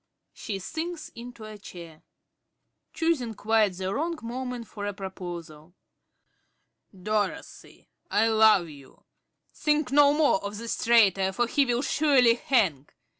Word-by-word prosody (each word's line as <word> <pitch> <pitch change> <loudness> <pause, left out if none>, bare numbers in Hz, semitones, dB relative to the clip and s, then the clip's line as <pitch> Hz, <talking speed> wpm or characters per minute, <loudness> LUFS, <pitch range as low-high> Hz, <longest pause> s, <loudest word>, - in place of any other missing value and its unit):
(She 205 -3 -5
sinks 320 - -6
into 235 -1 -11
a 215 -1 -10
chair.) 170 -4 -11
~Carey~ 155 - -21 0.9
(choosing 315 -9 -1
quite 215 -2 +2
the 185 +1 -4
wrong 330 +5 -2
moment 245 0 -5
for 205 -1 -6
a 205 - -4
proposal). 175 -4 -8 1.2
Dorothy, 215 - -4 0.2
I 220 +2 +2
love 220 -5 +5
you! 140 -4 -15 0.5
Think 300 -3 0
no 285 0 +6
more 295 -9 +2
of 200 +1 -5
this 230 +1 -4
traitor, 195 -5 +4
for 240 +5 0
he 275 +4 +1
will 245 +2 0
surely 275 -6 +4
hang. 195 - 0
220 Hz, 130 wpm, -26 LUFS, 190-260 Hz, 1.2 s, no